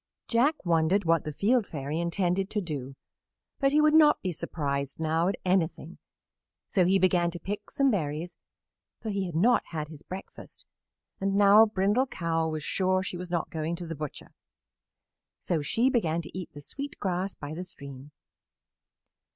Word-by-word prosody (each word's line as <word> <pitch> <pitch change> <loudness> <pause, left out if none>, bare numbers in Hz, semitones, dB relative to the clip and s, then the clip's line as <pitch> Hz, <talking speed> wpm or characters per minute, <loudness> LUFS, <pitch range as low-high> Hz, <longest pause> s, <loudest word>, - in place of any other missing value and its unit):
Jack 255 +2 +2
wondered 170 +3 +2
what 165 -1 +2
the 155 - -3
Field 215 - +2
Fairy 150 +1 -4
intended 180 +2 0
to 210 - -1
do, 140 -7 -5 0.6
but 275 -1 +3
he 300 - +4
would 305 0 +4
not 305 -1 +6
be 185 - -1
surprised 140 -4 -3
now 160 +2 +1
at 195 - 0
anything, 180 -2 0 0.7
so 185 -3 +2
he 190 +2 +4
began 180 -2 +3
to 175 0 -7
pick 205 +3 -5
some 275 -2 +2
berries, 165 -2 -2 0.6
for 220 - -4
he 195 -2 -1
had 170 - -7
not 235 +9 +4
had 155 -2 -5
his 155 -2 -11
breakfast, 190 +1 -10 0.5
and 195 0 0
now 205 +2 +7
Brindle 210 +6 +1
Cow 165 -5 -1
was 155 -1 -4
sure 185 +2 +1
she 185 - -5
was 180 0 -6
not 170 -2 -2
going 160 +1 -2
to 175 0 -6
the 165 - -5
butcher. 150 -2 -7 1.1
So 165 -3 -1
she 230 - +2
began 170 - +1
to - - -11
eat 185 -2 -6
the 145 - -9
sweet 280 - -7
grass 185 0 -2
by 145 +1 -7
the 175 +3 -5
stream. 140 -5 -8
180 Hz, 175 wpm, -28 LUFS, 160-200 Hz, 1.1 s, now